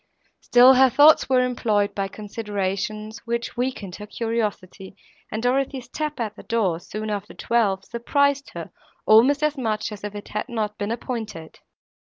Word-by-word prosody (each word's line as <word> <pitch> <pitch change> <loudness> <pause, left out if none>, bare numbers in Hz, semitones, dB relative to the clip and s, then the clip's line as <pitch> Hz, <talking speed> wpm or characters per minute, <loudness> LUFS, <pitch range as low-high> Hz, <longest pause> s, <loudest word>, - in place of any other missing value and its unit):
Still 250 +2 +6
her 265 0 +6
thoughts 295 +4 +6
were 255 -1 +4
employed 215 -5 0
by 195 -1 -2
considerations, 210 +1 -4
which 235 0 -3
weakened 240 -7 -3
her 210 - -9
curiosity, 210 -4 -4 0.4
and 220 +2 -3
Dorothée's 260 0 0
tap 300 +1 -4
at 215 -2 -3
the - - -11
door, 200 -8 0
soon 215 +4 -6
after 205 0 -5
twelve, 200 -5 0
surprised 280 +4 0
her - - -7 0.3
almost 260 +7 +5
as 300 -2 0
much 215 -3 -2
as 210 -1 -9
if 210 0 -5
it 205 - -8
had 210 +5 -4
not 215 -3 -3
been 205 0 -2
appointed. 220 -8 -5
220 Hz, 160 wpm, -23 LUFS, 205-250 Hz, 0.4 s, Still